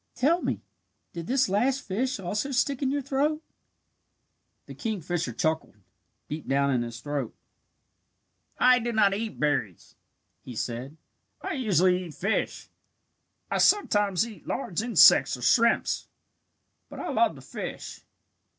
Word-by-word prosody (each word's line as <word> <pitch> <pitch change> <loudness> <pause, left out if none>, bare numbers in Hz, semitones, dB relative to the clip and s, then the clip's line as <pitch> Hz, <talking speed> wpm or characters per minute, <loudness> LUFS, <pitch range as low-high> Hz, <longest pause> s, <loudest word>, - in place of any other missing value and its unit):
Tell 325 +8 +2
me, - - -3 0.5
did 170 0 -6
this 265 0 +2
last 250 +8 +1
fish 235 +4 -2
also 205 +8 -2
stick 270 +1 0
in 270 - +1
your 285 0 -1
throat?" 290 +4 0 1.2
The - - -10
kingfisher 175 - -3
"chuckled" 160 +5 -2 0.5
deep 150 +1 -6
down 140 +1 +2
in 125 -2 +1
his 115 0 -6
throat. 145 -4 -4 1.2
"I 250 0 +5
do 240 0 -3
not 205 -3 +4
eat 215 +2 -4
berries," 140 - -1 0.5
he 125 - -9
said. 125 +7 -5 0.5
"I - - -3
usually 185 - +2
eat 160 - -10
fish. 200 +4 -2 0.8
I - - 0
sometimes 205 - +3
eat 220 -4 -13
large 205 -9 -2
insects 225 - +6
or 125 - -9
shrimps, 230 - +2 0.8
but - - -10
I - - -4
love - - +2
to - - -12
fish." - - -7
200 Hz, 135 wpm, -27 LUFS, 150-255 Hz, 1.2 s, insects